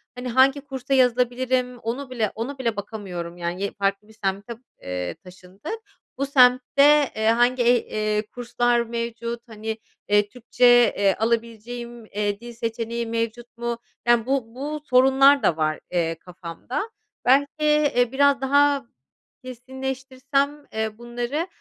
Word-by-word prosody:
hani, 250 0 -6
hangi 265 +3 +4
kursa 270 -1 -4
yazılabilirim 250 0 +2
onu 250 +4 -4
bile 225 -5 -1
ona 255 +5 -4
bile 235 -4 -1
bakamıyorum, 190 -5 -6
yani, 175 +2 -4
ye 200 - -1
farklı 195 +1 -1
bir 220 - -17
semte, 195 +4 -2 0.3
eee, 90 - -4
taşındık. 185 - -9 0.4
Bu 275 - 0
semtte, 275 +2 +5
eee, 220 - -2
hangi 240 +2 +3
eh 240 0 +2
eee, 215 0 0
kurslar 240 0 +1
mevcut, 235 0 -4
hani, 220 0 -5 0.3
eee, 205 0 +3
Türkçe, 245 +2 0 0.3
eee, 200 -1 +3
alabileceğim, 235 +1 -3
eee, 205 -1 -2
dil 240 +1 -10
seçeneği 230 0 -3
mevcut 230 +1 -4
mu, 235 0 -3 0.3
yani, 240 -2 +4
bu 255 -3 -2
bu 295 +3 -4
sorunlar 270 +2 +5
da 165 - +2
var, 155 -1 0
eee, 165 -2 0
kafamda. 180 - -6 0.4
Belki, 275 +3 +5
eee, 300 -5 +3
biraz 280 0 +3
daha 280 0 +3 0.6
kesinleştirsem, 265 +3 -3
eee, 220 -1 -2
bunları, 240 +7 -3
240 Hz, 135 wpm, -23 LUFS, 220-265 Hz, 0.6 s, semtte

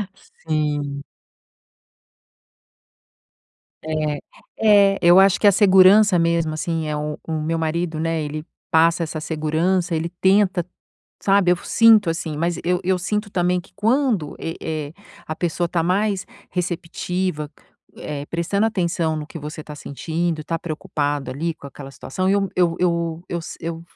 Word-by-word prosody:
Sim. 150 -5 -3 2.8
É, 155 -2 -2 0.7
é, - - -4
eu 175 +2 +7
acho 195 -1 +5
que 210 - +4
a - - +8
segurança 195 +1 +6
mesmo 165 -1 +1
assim 165 0 -2
é 150 - -2
o 150 0 -3
o 160 - -3
meu 165 +2 -1
marido, 160 0 -2
né, 165 0 -1
ele 150 +1 -5 0.3
passa 165 +1 +4
essa 155 -1 -4
segurança, 165 +3 0
ele 165 +1 -2
tenta, 190 -2 +3 0.6
sabe, 195 -2 +3
eu 180 - +4
sinto 220 +1 +4
assim, 165 -2 -4
mas 170 +2 -1
eu 180 +1 +1
eu 185 0 +1
sinto 210 +3 -2
também 180 -1 +1
que - - -21
quando 225 - +1
é 165 - -4 0.3
é, - - -13 0.3
a 155 - -4
pessoa 175 0 -1
está 170 -1 -1
mais 195 +2 0 0.2
receptiva, 175 -2 -3 0.5
eh, 145 -1 -6
prestando 170 +7 0
atenção 170 -6 -1
no 150 -1 -5
que 165 - -9
você 150 +1 -7
está 150 0 -9
sentindo, 160 +3 -3
está 165 +2 -3
preocupado 145 -4 -3
ali 160 +6 -3
com 140 - -12
aquela 135 0 -10
situação, 185 +7 -3
eu 195 0 +2
eu 175 -2 +2
eu 170 -2 0
eu 170 - -3
si 165 - -8
eu 165 0 -5
170 Hz, 150 wpm, -21 LUFS, 155-185 Hz, 2.8 s, a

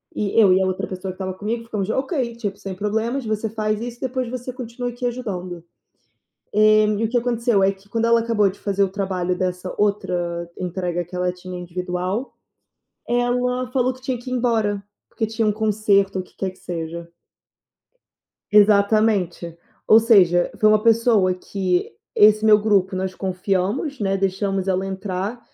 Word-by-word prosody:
E 210 +1 -2
eu 205 -4 +6
e 190 - +3
a - - +2
outra 185 0 -2
pessoa 185 0 -5
que - - -12
estava 190 -1 -4
comigo 220 +5 -4
ficamos: 210 -3 -3
"Ok, 260 -1 -1
tipo, 205 -4 -4
sem 195 -2 -6
problemas. 220 +6 -2
Você 215 0 -1
faz 215 -1 -1
isso, 240 +1 -7
depois 255 -1 -2
você 255 +1 -5
continua 245 0 -5
aqui 245 +1 -6
ajudando." 185 -8 -5 0.9
E 215 0 +5 0.2
o 220 - -2
que 245 - +1
aconteceu 235 -3 +1
é 195 - +4
que 195 +1 -16
quando 230 +2 0
ela 230 0 +4
acabou 215 -4 +2
de 195 - -11
fazer 200 -1 0
o 195 - +1
trabalho 185 -2 -2
dessa 180 0 -3
outra 180 -4 -1
entrega 180 -1 -2
que 175 - -10
ela 180 0 0
tinha 180 0 -8
individual, 180 +6 -3 0.8
ela 250 +1 0
falou 255 -1 +1
que 255 - -18
tinha 255 -1 -2
que 245 +2 -9
ir 255 - -1
embora, 220 -5 0 0.3
porque 220 - -2
tinha 220 0 -1
um - - +2
concerto 205 -2 +1
o - - -4
que - - -25
quer 190 - -2
que 185 - -23
seja. 170 0 -6 1.4
Exatamente, 200 -4 +3 0.3
ou 220 - +8
seja, 185 -6 +4
foi 215 - +5
uma 215 0 +4
pessoa 225 -4 +3
que 185 -1 -2 0.2
esse 215 +1 +6
meu 215 -1 +6
grupo 195 -3 +2
nós 185 0 -2
confiamos, 195 - -2
né, 195 -1 0
deixamos 195 0 -1
ela 190 0 0
entrar, 195 +3 -4
205 Hz, 175 wpm, -22 LUFS, 185-230 Hz, 1.4 s, ou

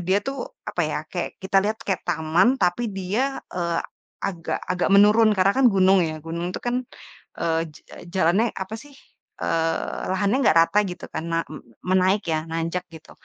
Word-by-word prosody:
dia 190 - +4
tuh 275 0 -3 0.3
apa - - -2
ya, - - -2 0.2
kayak - - -3
kita 190 +1 0
lihat 215 +1 0
kayak 195 - 0
taman 165 +5 +3
tapi 180 +7 +2
dia, 195 +5 -1 0.3
eee, 170 -2 -1 0.5
agak 170 -4 -3
agak 180 0 0
menurun 215 +2 +6
karena 190 +2 +4
kan 270 -1 +4
gunung 190 -1 +4
ya. 155 -1 -2
Gunung 170 +2 -3
tuh - - -5
kan, 245 +1 +1 0.6
eee, 165 -1 +1
j - - -13 0.4
jalannya 190 +5 +3 0.2
apa 190 +3 -6
sih, 290 - -15 0.5
eee, 165 0 -1
lahannya 200 +5 +1
nggak 190 - +4
rata 165 +5 +3
gitu 180 - -8
kan, 160 - -3
ma 165 - +2
me 155 - -9 0.3
menaik 190 +2 +3
ya, 155 - +2
nanjak 165 +2 -2
gitu. 160 - -13
185 Hz, 175 wpm, -24 LUFS, 165-200 Hz, 0.6 s, menurun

